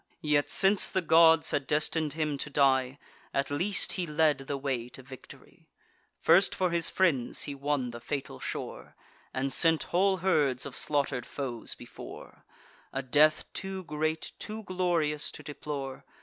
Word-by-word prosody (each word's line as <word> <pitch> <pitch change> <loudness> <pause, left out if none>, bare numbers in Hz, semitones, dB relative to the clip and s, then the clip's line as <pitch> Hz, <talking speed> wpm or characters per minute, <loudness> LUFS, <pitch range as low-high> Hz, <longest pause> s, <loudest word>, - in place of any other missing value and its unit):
Yet, 150 -1 +2
since 195 +1 +4
the 190 - -1
gods 165 0 +5
had 140 -2 -1
destin'd 150 0 0
him 155 -2 -1
to 150 - -4
die, 135 -2 +2 0.4
At 140 +1 0
least 185 +7 +1
he 180 -2 -2
led 150 -2 +2
the 140 +1 -4
way 130 -3 -3
to 130 - -9
victory: 130 0 -14 0.5
First 175 +4 +4
for 185 -2 0
his 170 -1 +2
friends 155 -10 +1
he 145 - -2
won 140 -3 -2
the 120 - -8
fatal 130 - -5
shore, - - -6 0.4
And 135 +1 -2
sent 165 -2 +4
whole 190 +2 +3
herds 150 -9 +1
of 140 - -6
slaughter'd 140 -4 0
foes 125 -5 -4
before; - - -12 0.5
A 135 - -3
death 150 +4 +3
too 190 -1 -5
great, 155 0 -2
too 220 +1 -6
glorious 175 -6 0
to 150 - -11
deplore. 140 -2 -6
150 Hz, 155 wpm, -29 LUFS, 135-165 Hz, 0.5 s, gods